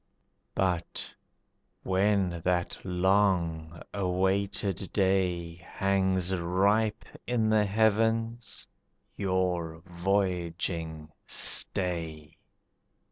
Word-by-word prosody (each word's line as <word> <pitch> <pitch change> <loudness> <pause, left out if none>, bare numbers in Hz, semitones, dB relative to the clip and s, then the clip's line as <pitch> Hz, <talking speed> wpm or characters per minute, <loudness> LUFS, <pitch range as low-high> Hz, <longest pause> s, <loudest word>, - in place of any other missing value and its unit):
But 90 -3 -2 0.7
when 95 -2 +1
that 90 -1 0
long 90 -3 +1
awaited 95 0 -1
day 90 -4 0
Hangs 95 0 0
ripe 100 +5 +1 0.2
in 115 -3 +1
the 110 -1 +4
heavens, 110 +1 0 0.5
your 90 -4 -1
voyaging 85 -4 -2 0.2
stay. 80 -5 +1
95 Hz, 65 wpm, -29 LUFS, 85-100 Hz, 0.7 s, the